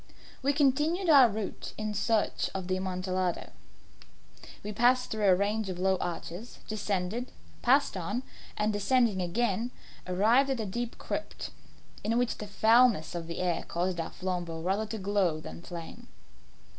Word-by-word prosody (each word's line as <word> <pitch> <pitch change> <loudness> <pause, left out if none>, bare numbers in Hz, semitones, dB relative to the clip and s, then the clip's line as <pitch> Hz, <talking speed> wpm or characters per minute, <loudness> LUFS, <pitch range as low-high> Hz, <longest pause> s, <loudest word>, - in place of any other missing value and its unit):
We 275 - +3
continued 300 +6 +2
our 270 -5 +8
route 210 -1 -5
in 215 0 -2
search 215 +1 +1
of 190 -2 -3
the 185 - +1
Amontillado. 185 -1 -2 1.1
We 210 - -4
passed 245 +4 +3
through 215 -2 +2
a 185 - +7
range 205 +2 0
of 180 - -4
low 190 +1 +2
arches, 175 +5 -5
descended, 210 +2 -2 0.3
passed 270 -1 +3
on, 205 +8 -2 0.3
and 210 0 +1
descending 205 -1 +2
again, 220 +5 0 0.4
arrived 220 +9 +4
at 265 -3 0
a 220 - -1
deep 235 +4 -4
crypt, - - -5 0.5
in 225 +2 +1
which 245 -2 0
the 210 - -5
foulness 220 -2 +4
of 170 -1 -4
the 170 - -4
air 175 -2 0
caused 175 +1 -1
our 165 - -2
flambeaux 175 -3 -4
rather 200 +4 0
to 220 +1 -4
glow 190 -5 +1
than 155 - -9
flame. 175 +8 -9
205 Hz, 155 wpm, -30 LUFS, 185-240 Hz, 1.1 s, our